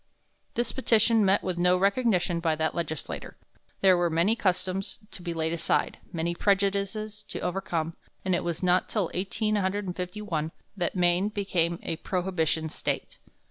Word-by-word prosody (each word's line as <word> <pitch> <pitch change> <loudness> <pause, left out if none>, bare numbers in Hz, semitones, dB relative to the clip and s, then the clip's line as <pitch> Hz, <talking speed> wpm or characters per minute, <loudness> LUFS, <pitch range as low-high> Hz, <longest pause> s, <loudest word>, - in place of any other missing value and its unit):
This 240 0 0
petition 225 -3 +4
met 195 +1 +3
with 180 -2 -2
no 180 +1 +4
recognition 195 -3 +2
by 165 -2 +1
that 160 0 0
legislature. 160 -3 -4 0.4
There 190 -1 +7
were 175 -1 +2
many 170 +7 +3
customs 185 -2 0
to - - -9
be 175 -1 -3
laid 160 0 -1
aside, 170 - 0
many 170 0 -1
prejudices 200 +2 0
to - - -5
be - - -5
overcome, 170 -3 -2 0.3
and 185 - +2
it 175 - +1
was 170 0 -3
not 180 0 +3
till 205 -6 0
1851 190 -3 -1 0.2
that 175 -2 -1
Maine 180 +2 +3
became 180 -5 0
a 165 - -2
prohibition 170 -4 -1
State. - - -3
180 Hz, 150 wpm, -28 LUFS, 170-200 Hz, 0.4 s, There